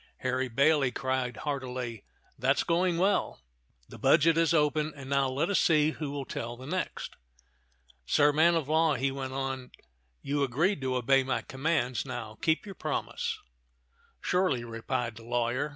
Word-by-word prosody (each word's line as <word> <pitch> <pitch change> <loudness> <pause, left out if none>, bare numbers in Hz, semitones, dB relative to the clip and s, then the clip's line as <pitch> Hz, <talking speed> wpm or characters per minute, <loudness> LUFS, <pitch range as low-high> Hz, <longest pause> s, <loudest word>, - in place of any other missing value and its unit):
Harry 130 0 0
Bailey 140 +3 +3
cried 130 -2 -2
heartily, 125 -6 -4 0.3
"That's 135 +3 +2
going 175 0 +1
well. 195 +4 +1 0.5
The - - -12
budget 165 +1 +5
is 165 0 +3
open, 150 -1 +2
and 135 -1 -9
now 140 -1 +2
let 145 +9 0
us 200 - +3
see 155 -2 +4
who 155 -2 -5
will 140 -1 -4
tell 120 0 -5
the 130 - -10
next. 185 +6 -4 0.9
Sir 145 0 +4
man 165 +3 +4
of 160 -4 -1
law," 160 0 +3
he 135 +2 0
went 135 -1 -5
on, 135 -1 -3 0.5
"you 145 +1 -1
agreed 145 +7 +1
to 130 -1 -1
obey 135 +2 +3
my 130 0 -2
commands; 130 -3 -1
now 110 -3 -6
keep 165 +2 +1
your 200 - -7
promise." - - -3 0.8
"Surely," 180 -10 +1
replied 115 0 -3
the 115 - -11
lawyer. 120 +4 -1
135 Hz, 160 wpm, -29 LUFS, 125-155 Hz, 0.9 s, budget